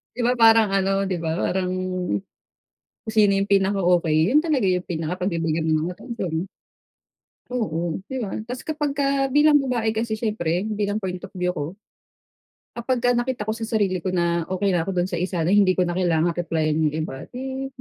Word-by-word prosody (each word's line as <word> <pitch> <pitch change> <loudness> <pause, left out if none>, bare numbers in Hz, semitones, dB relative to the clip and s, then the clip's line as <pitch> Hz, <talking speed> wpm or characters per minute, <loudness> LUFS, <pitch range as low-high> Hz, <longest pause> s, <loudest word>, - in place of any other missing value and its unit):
di 250 - -3
ba 245 - +3
parang 225 -2 +6
ano 195 0 +1
di 185 - -1
ba 160 -1 -1
parang, 185 -1 0 1.3
kung 220 - -6
sino 210 -2 +5
yung 195 - -1
pinaka-okay 190 -5 +2 0.2
yun 295 - +6
talaga 285 - +1
yung 180 -1 +1
pinakapagbibigyan 165 -1 -2
mo - - +2 0.2
ng - - -3
atensyon. 190 -6 -4 1.0
Oo, 175 -8 -2
'di 265 - -6
ba? 200 - -4 0.2
Tas 250 +1 -6
kapag 295 -2 -2
ka 275 -1 +1
bilang 295 +2 +5
babae 245 -5 0
kasi 220 0 -2
syempre 200 -6 -1
bilang 210 -1 -2
point 180 -1 -3
of 195 +1 -11
view 180 0 0
ko, 155 +2 -5 1.0
kapagka 245 0 0
nakita 240 -1 0
ko 215 - -2
sa 225 +1 -3
sarili 205 -5 0
ko 185 +2 -3
na 170 -1 +1
okay 190 +2 0
na 175 -3 0
ako - - -1
dun 180 0 0
sa 175 - -2
isa 180 -1 -1
na 165 - +1
hindi 195 -2 +5
ko 185 - +2
na 175 0 -1
kailangang 170 -2 +2
replyan 160 -3 0
yung - - -10
iba 135 -3 -6
di 265 +1 -4
195 Hz, 185 wpm, -23 LUFS, 175-230 Hz, 1.3 s, parang